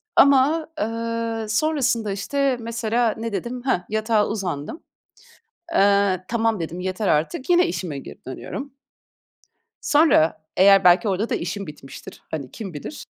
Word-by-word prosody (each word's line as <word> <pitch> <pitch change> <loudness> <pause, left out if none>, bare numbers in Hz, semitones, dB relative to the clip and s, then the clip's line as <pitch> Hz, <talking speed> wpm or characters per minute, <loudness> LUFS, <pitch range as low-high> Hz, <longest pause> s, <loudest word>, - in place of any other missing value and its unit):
ama, 280 +4 +4
eee, 230 0 -2
sonrasında, 235 -4 +1
işte, 260 +6 0
mesela, 230 0 0
ne 230 +1 -4
dedim? 240 +6 -4
Heh, 260 -9 +2
yatağa 220 0 +1
uzandım. 185 - -4 0.9
Eee, 200 - +3
"Tamam." 225 -2 0
dedim, 165 +1 -5
"Yeter 185 +3 -2
artık." 155 - 0
Yine 355 0 +5
işime 160 - -4
geri - - -12
dönüyorum. 270 - -7 1.1
Sonra, 290 - +3
eğer 195 0 +6
belki 180 +5 +5
orada 200 +4 -1
da - - 0
işim 185 +3 -4
bitmiştir, 140 -2 -11
hani, 140 -5 -5
kim 195 -5 -7
bilir, 155 - -7
220 Hz, 130 wpm, -22 LUFS, 185-240 Hz, 1.1 s, eğer